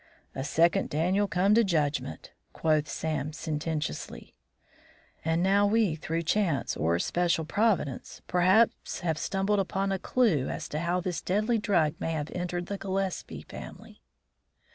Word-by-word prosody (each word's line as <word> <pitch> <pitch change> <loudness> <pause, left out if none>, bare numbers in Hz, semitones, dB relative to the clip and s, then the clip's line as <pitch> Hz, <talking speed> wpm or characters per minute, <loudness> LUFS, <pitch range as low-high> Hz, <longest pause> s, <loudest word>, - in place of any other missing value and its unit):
"A 135 - -4
second 165 +4 +2
Daniel 185 +7 +1
come 190 +2 +2
to 230 +2 +5
judgment," 155 -6 -1 0.2
quoth 155 -1 +1
Sam, 155 0 -3
sententiously. 155 - -4 0.9
"And 165 +2 +1
now 200 +2 +4
we, 215 -4 +2
through 165 +2 -3
chance 170 -3 0
or 85 +3 +1
special 170 - 0
providence, 190 - -1
perhaps, 185 +6 +2
have 160 -3 -1
stumbled 195 +1 0
upon 195 +1 -1
a 190 - -1
clue 190 - +2
as - - -4
to 150 - -3
how 175 +2 0
this 180 -1 -3
deadly 215 +5 +1
drug 175 -7 +2
may 165 - -2
have 150 -1 -3
entered 175 0 -3
the 200 +1 -5
Gillespie 190 - -3
family." - - -11
175 Hz, 140 wpm, -28 LUFS, 155-195 Hz, 0.9 s, to